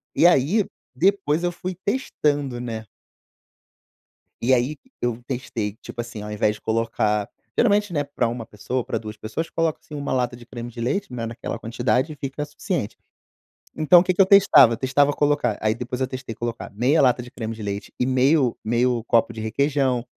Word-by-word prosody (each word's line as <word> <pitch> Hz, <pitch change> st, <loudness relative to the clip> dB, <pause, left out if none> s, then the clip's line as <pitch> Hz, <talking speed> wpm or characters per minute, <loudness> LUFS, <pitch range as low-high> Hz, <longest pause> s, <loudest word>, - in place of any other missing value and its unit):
E 170 Hz, -, +6 dB
aí, 175 Hz, -, +3 dB, 0.3 s
depois, 175 Hz, -1 st, +2 dB
eu 175 Hz, -, +1 dB
fui 180 Hz, +1 st, -5 dB
testando, 145 Hz, -, 0 dB
né? 115 Hz, -2 st, -5 dB, 1.6 s
E 125 Hz, +3 st, +3 dB
aí, 130 Hz, +4 st, +2 dB, 0.2 s
eu 120 Hz, -1 st, -1 dB
testei, 115 Hz, -5 st, -3 dB
tipo 120 Hz, -, -7 dB
assim, 115 Hz, -3 st, -6 dB
ao 105 Hz, -, -6 dB
invés 105 Hz, 0 st, +1 dB
de -, -, -17 dB
colocar 110 Hz, -2 st, 0 dB, 0.3 s
geralmente, 205 Hz, -4 st, +3 dB
né, 145 Hz, -3 st, +1 dB
para 140 Hz, -4 st, -1 dB
1 115 Hz, 0 st, -4 dB
pessoa, 125 Hz, +5 st, -3 dB
para 115 Hz, -, -2 dB
2 110 Hz, -1 st, -8 dB
pessoas, 110 Hz, +10 st, -4 dB
coloca, 165 Hz, -2 st, 0 dB
assim, 150 Hz, -, -12 dB
1 145 Hz, -1 st, -3 dB
lata 125 Hz, -2 st, 0 dB
de 120 Hz, -, -13 dB
creme 120 Hz, 0 st, -7 dB
de 115 Hz, -, -8 dB
leite, 195 Hz, -, -1 dB
né, 120 Hz, -2 st, -3 dB
naquela 115 Hz, 0 st, -5 dB
quantidade 120 Hz, +5 st, 0 dB
e -, -, -10 dB
fica 140 Hz, +1 st, -4 dB
suficiente. 150 Hz, -, -3 dB, 0.8 s
Então 155 Hz, +3 st, +6 dB
o -, -, 0 dB
que 185 Hz, -, +1 dB
que 180 Hz, -, +4 dB
eu -, -, +7 dB
testava? 190 Hz, -, +7 dB
Testava 140 Hz, +3 st, +2 dB
colocar, 145 Hz, -7 st, +1 dB
aí, 110 Hz, 0 st, +1 dB
depois 125 Hz, +2 st, -5 dB
eu 130 Hz, -, +1 dB
testei 130 Hz, -2 st, -6 dB
colocar 120 Hz, 0 st, -5 dB
meia 125 Hz, +9 st, +3 dB
lata 125 Hz, -1 st, +3 dB
de 125 Hz, -, -10 dB
creme 115 Hz, -4 st, -5 dB
de 110 Hz, -, -10 dB
leite 100 Hz, 0 st, -5 dB
e 125 Hz, -, +2 dB
meio 130 Hz, 0 st, +3 dB
meio 120 Hz, +1 st, +1 dB
copo 115 Hz, 0 st, +3 dB
de 110 Hz, -1 st, -7 dB
requeijão, 130 Hz, +1 st, +1 dB
125 Hz, 190 wpm, -23 LUFS, 115-150 Hz, 1.6 s, eu